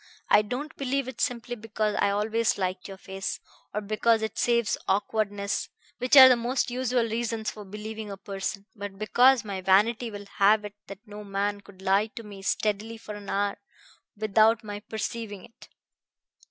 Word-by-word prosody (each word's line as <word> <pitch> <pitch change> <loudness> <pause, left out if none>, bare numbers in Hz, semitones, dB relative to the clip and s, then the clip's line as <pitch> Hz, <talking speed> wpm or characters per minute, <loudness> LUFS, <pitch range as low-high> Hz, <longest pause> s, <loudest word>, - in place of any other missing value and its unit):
I - - +7
don't 255 +9 -5
believe 275 -1 -1
it 260 -3 -6
simply 245 0 -1
because 215 -1 -2
I - - +3
always 215 +3 +1
liked 185 -1 -2
your 195 -1 -9
face, 190 0 -5 0.3
or 210 - -2
because 220 +2 +2
it 220 - -3
saves 235 -2 +2
awkwardness, 205 0 -1 0.3
which 255 +3 +4
are 260 -1 +13
the 255 - +6
most 245 +2 -1
usual 250 -1 +1
reasons 230 -1 -2
for 210 - -10
believing 215 +2 -7
a 200 - -6
person, 195 0 -5
but 200 -2 -7
because 245 +4 +4
my 195 -2 -4
vanity 215 +6 +3
will 205 -1 -8
have 210 +1 +5
it 205 - -7
that 200 +3 -10
no 210 -1 -9
man 200 0 -2
could 190 -2 -16
lie 195 +3 +3
to 230 0 -9
me 200 -2 -10
steadily 215 +3 -1
for 215 -1 -8
an 205 -1 -9
hour 200 0 0 0.6
without 220 +2 +3
my 205 -1 -6
perceiving 215 -2 -5
it. 230 - -18
215 Hz, 175 wpm, -27 LUFS, 200-230 Hz, 0.6 s, are